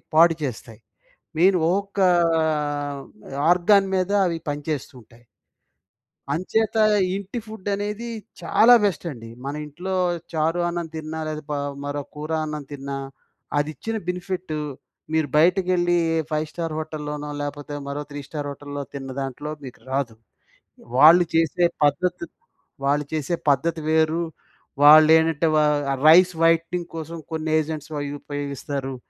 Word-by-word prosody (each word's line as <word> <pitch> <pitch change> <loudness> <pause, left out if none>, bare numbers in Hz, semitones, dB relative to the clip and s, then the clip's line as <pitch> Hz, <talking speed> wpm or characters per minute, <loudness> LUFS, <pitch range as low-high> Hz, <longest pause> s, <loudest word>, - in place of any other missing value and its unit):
పాడుచేస్తాయి. 155 -9 +2 0.6
మెయిన్ 185 +2 +5
ఒక్కొక్క 200 +1 -2 0.4
ఆహ్, 145 -2 -2 0.5
ఆర్గాన్ 195 +3 +4
మీద 185 +1 0 0.2
అవి 165 -1 -2
పనిచేస్తూ 145 -1 -4
ఉంటాయి. 120 +2 -22 1.1
అంచేత, 215 +8 0 0.4
ఇంటి 200 +4 -5
ఫుడ్ 215 -3 -10
అనేది 210 +3 -4 0.3
చాలా 240 +3 +5
బెస్ట్ 195 -3 0
అండి. 115 -3 -10 0.2
మన 140 - -3
ఇంట్లో 175 +6 -6 0.4
చారు 160 +2 +1
అన్నం 170 -1 -3
తిన్నా 160 0 -5
లేదా, 155 0 -4
ప - - -1 0.3
మరో 145 0 -3
కూర 150 +2 -6
అన్నం 150 -1 -5
తిన్నా, 140 -1 -5 0.6
అది 145 +1 +1
ఇచ్చిన 225 0 -4
బెనిఫిట్, 180 -1 -4 0.6
మీరు 160 -2 +2
బయటకెళ్ళి 175 +1 +3 0.2
ఏ - - +2
ఫైవ్-స్టార్ 155 +1 -3
హోటల్‌లోనో 150 -1 -5
లేకపోతే, 145 0 -5
మరో 140 +1 -3
త్రీ 145 - -5
స్టార్ 145 -2 -5
హోటల్‌లో 145 0 -6
తిన్న 135 -1 -6
దాంట్లో 135 +3 -5
మీకు 125 -4 -10
రాదు. 135 -4 -1 0.8
వాళ్ళు 165 +6 +8
చేసే 165 +2 +3 0.2
పద్ధతి 175 +5 0
త్ - - -52 0.5
వాళ్ళు 145 +1 +1
చేసే 155 +3 -1
పద్ధతి 160 +4 +1
వేరు. 160 +1 +2 0.6
వాళ్ళు 155 +1 +9
ఏంటంటే, 160 0 +1
వ - - +5 0.5
రైస్ 180 +3 +7
వైటనింగ్ 165 +1 +2
కోసం 165 +1 -6
కొన్ని 160 0 -3
ఏజెంట్స్ 155 0 -5
అవి 145 0 -4
ఉపయోగిస్తారు. 140 -1 -4
155 Hz, 130 wpm, -23 LUFS, 145-175 Hz, 1.1 s, వాళ్ళు